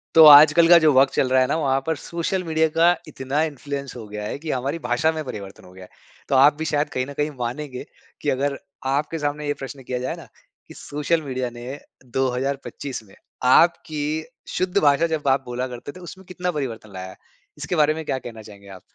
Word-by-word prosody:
तो, 160 - +9
आजकल 150 +3 +9
का 175 - +10
जो 155 -2 +4
वक़्त 135 +1 +4
चल 130 - +1
रहा 130 0 +4
है 130 - +2
ना। 140 - 0
वहाँ 135 -4 +1
पर 160 - +1
सोशल 170 +5 -3
मीडिया 160 -1 +1
का 170 +2 +5
इतना 140 0 -2
इन्फ्लुएंस 140 -2 -5
हो 115 -3 -9
गया 105 0 -6
है, 105 - -4
कि 155 +1 -4
हमारी 135 +6 -2
भाषा 125 +4 +1
में 160 -1 -4
परिवर्तन 100 -7 -8
हो 90 - -15
गया 95 0 -12
है। - - -20 0.4
तो 140 - +2
आप 140 +3 +7
भी 160 - -3
शायद 150 -1 0
कहीं 130 -3 -2
न 140 - -9
कहीं 150 +2 -1
मानेंगे, 125 +2 -5 0.4
की - - -1
अगर 140 +1 0 0.3
आपके 150 +4 -1
सामने 145 0 -3
ये 145 - +1
प्रश्न 135 -1 -9
किया 125 0 -3
जाए 125 - -3
ना, - - -12 0.4
कि - - -12
सोशल 150 +3 -2
मीडिया 130 -4 -3
ने 120 +4 -8 0.3
2025 130 +1 -3
में 100 -2 -19 0.3
आपकी 155 +2 +2 0.2
शुद्ध 185 0 -2
भाषा 145 +3 +4
जब 155 -3 -3
आप 135 0 +3
बोला 125 +1 -3
करते 125 +2 -8
थे। 185 - -13
उसमें 185 +2 -11
कितना 180 0 -3
परिवर्तन 115 - -5
लाया 95 0 -7
है? - - -13 0.4
इसके - - -3
बारे 155 -1 +3
में 160 - -6
क्या 135 - -1
कहना 115 -3 -9
चाहेंगे 100 -2 -14
आप? 95 -2 -11
140 Hz, 220 wpm, -22 LUFS, 125-155 Hz, 0.4 s, का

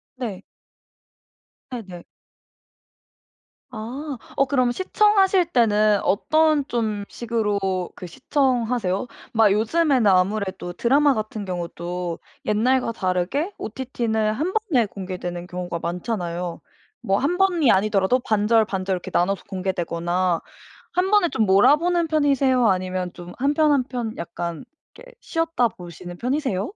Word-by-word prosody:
네. 215 -7 -5 1.3
네네. 195 -8 -8 1.7
아. 255 +5 -6 0.2
어 275 - +3
그럼 255 -2 +2
시청하실 385 - +3
때는 215 -3 +4
어떤 305 +6 +2
좀 215 -4 -2
식으로 220 -4 -1 0.4
그 - - -8
시청하세요? 245 - 0 0.3
막 220 -3 +5
요즘에는 250 +2 +2
아무래도 190 -1 +1
드라마 280 +6 +3
같은 215 -2 -4
경우도 175 -1 -4 0.3
옛날과 235 +3 +2
다르게 195 - -1
OTT는 220 -3 -2
1 320 +11 -2 0.2
번에 240 -5 +4
공개되는 180 -2 -6
경우가 180 -2 -4
많잖아요. 175 -1 -3 0.4
뭐 195 0 +1
1 335 +6 0
번이 350 -9 +3
아니더라도 200 +4 +2
반절, 220 0 +2
반절 190 -1 -2
이렇게 180 - -4
나눠서 195 +3 +1
공개되거나 180 -1 -1 0.5
1 365 +2 +1
번에 410 -5 +4
좀 220 - +1
몰아보는 320 - +4
편이세요? 275 -5 +3
아니면 185 -1 -1
좀 175 0 -10
1 280 +3 +1
편, 305 0 +3
1 275 -3 +3
편 240 -3 -4
약간 170 -1 -5 0.3
이렇게 - - -14
쉬었다 330 -7 0
보시는 175 -1 -10
편이세요? 250 -4 -1
220 Hz, 270 characters per minute, -23 LUFS, 185-275 Hz, 1.7 s, 막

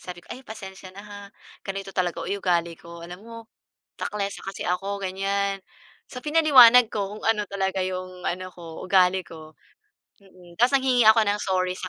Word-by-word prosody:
Sabi 180 -1 -10
ko, - - -8
"Ay 255 - -9
pasensiya 195 -6 -10
na 200 - -9
ha, 205 -1 -10 0.4
ganito 195 0 -6
talaga 180 -2 -2
o - - -7
yu 200 0 -2
ugali 170 -2 +1
ko. 170 +1 -12
Alam 175 +2 -10
mo 230 +2 -12 0.7
taklesa 200 -1 -3
kasi 195 0 -7
ako." 195 +3 -2
Ganyan. 195 +1 -1 0.5
So, 250 -1 -9
pinaliwanag 265 -7 +7
ko 205 -1 -4
kung - - -17
ano 210 -2 +2
talaga 190 -1 -2
'yong 185 -1 -6
ano 185 +1 -3
ko, 170 -3 -11
ugali 185 0 +4
ko. 160 -3 -12 0.7
Mm, 180 -3 -19
tapos 250 +4 +4
nanghingi 255 -4 +2
ako 220 +1 +7
ng 205 0 0
sorry 185 -2 0
sa 185 - -5
195 Hz, 180 wpm, -24 LUFS, 180-210 Hz, 0.7 s, pinaliwanag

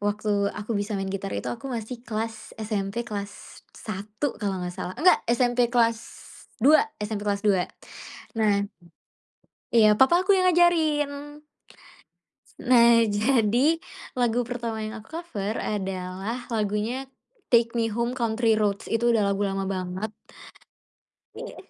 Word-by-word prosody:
waktu 205 +1 -1 0.2
aku 210 +2 -4
bisa 205 0 -2
main 195 0 -3
gitar 195 0 -4
itu 115 +5 -4
aku 270 - -7
masih 235 +1 -5
kelas 225 -1 -5
SMP 215 +1 -3
kelas 205 -3 -7 0.2
1 215 +6 -4
kalau 200 -3 -1
enggak 180 0 -4
salah. 180 +1 -6
Enggak, 365 +3 +5
SMP 245 0 +2
kelas 230 -2 +2 0.6
dua 290 +7 +6 0.2
SMP 210 0 -4
kelas 200 0 -1
2. 190 -4 +2 0.7
Nah 200 -2 +3 1.1
Iya, 215 -2 +7
papa 345 +7 +5
aku 400 - +3
yang 370 -2 +4
ngajarin. 325 -5 +3 1.5
Nah, 235 -2 +6
jadi 230 +4 +2 0.5
lagu 245 -1 +1
pertama 235 -2 -4
yang 215 - -6
aku 215 - -17
cover 215 - -4
adalah 195 +3 -4
lagunya 220 +5 -1 0.4
Take 235 -1 +4
Me 230 -1 0
Home, 235 +3 -1
Country 230 -2 +1
Roads. 210 -1 0
Itu 235 +1 +2
udah 210 -4 +2
lagu 195 - -3
lama 195 -1 -1
banget. 190 +2 -3 1.2
Iya. - - -8
220 Hz, 135 wpm, -25 LUFS, 205-240 Hz, 1.5 s, Iya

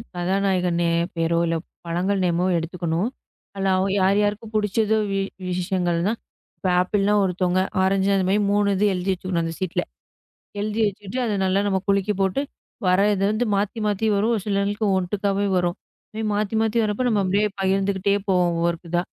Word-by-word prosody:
கதாநாயகன் 180 -1 0
நே 170 - +2 0.3
பெயரோ 165 0 +1
இல்ல 165 - 0 0.3
பழங்கள் 185 +4 0
நேமோ 175 0 +1
எடுத்துக்கணும். 170 +3 -2 0.5
அதுல 195 -1 0
அவ 185 - +1 0.2
யார் 195 +2 +3
யாருக்கு 210 +2 -1
புடிச்சதோ 215 +1 +1
வி 195 - 0 0.3
விஷயங்கள் 180 -1 0
தான். 225 +2 -1 0.4
இப்ப 190 - -3
ஆப்பிள்ன்னா 200 +2 +1
ஒருத்தவுங்க, 185 0 +1 0.2
ஆரஞ்சுன்னா 195 +1 +2
இதுமாரி 190 +2 +2
3 205 0 +2
இது 200 +2 +2
எழுதி 185 +1 -1
வச்சுக்கணும், 185 -1 -2
அந்தச் 165 0 -5
சீட்டுல. 185 -3 -1 0.8
எழுதி 210 +2 -2
வச்சிட்டு 200 +3 -6
அதை 220 - -1
நல்லா 190 +1 +2
நம்ம 190 -1 +1
குலுக்கி 200 +1 +2
போட்டு, 195 +7 +1 0.5
வர்றது 195 +2 +3
வந்து 220 +3 0
மாத்தி, 205 +3 -1
மாத்தி 210 +1 0
வரும். 210 +4 +1
ஒரு 215 - -2
சிலங்களுக்கு 205 +1 0
ஒட்டுக்காவே 200 +2 -1
வரும். 175 -1 0 0.6
மாத்தி, 210 +1 -1
மாத்தி 225 +1 0
வர்றப்போ 210 +3 -1
நம்ம 210 -3 +2
அப்டியே 200 +3 +2
பகிர்ந்துக்கிட்டே 195 +1 +1
போவோம், 180 -2 +3
ஒவ்வொரு 170 0 +1
க் - - -12
இதா. 175 0 +1
195 Hz, 165 wpm, -23 LUFS, 180-205 Hz, 0.8 s, யார்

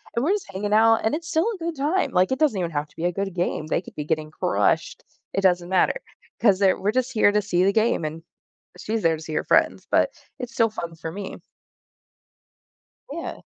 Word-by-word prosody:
and 235 - +1
we're 360 - +2
just 405 - -4
hanging 205 +2 -2
out, 225 +1 +6
and 220 - +2
it's 325 +1 -6
still 330 +4 +2
a - - -10
good 335 -1 -4
time, 305 +7 0
like, 185 +5 +2
it 260 - -3
doesn't 290 -11 +2
even 170 -2 -2
have 150 -1 -2
to - - -26
be 165 - -2
a 175 - +2
good 195 +1 -3
game, 175 -3 -2
they 165 - 0
could - - -14
be 150 - -3
getting 155 0 -1
crushed. 100 -8 0 0.3
It 195 - 0
doesn't 180 -2 +2
matter 190 - +2 0.4
'cause 200 -5 +5
they're 195 -2 +3
we're 205 - +1
just 255 +2 -1
here 215 -3 +4
to 210 - +2
see 185 -3 +1
the 195 +1 +3
game, 220 -4 +2
and 160 +2 -5 0.6
she's 225 0 -2
there 165 -1 +3
to - - -11
see 160 -1 -7
her - - 0
friends, - - +2
but - - +3 0.3
it's 250 0 -6
still 230 -3 +3
fun 170 -6 -6
for 160 0 -6
me. 195 +2 -6 1.8
Yeah. - - -6
200 Hz, 230 wpm, -24 LUFS, 170-235 Hz, 1.8 s, out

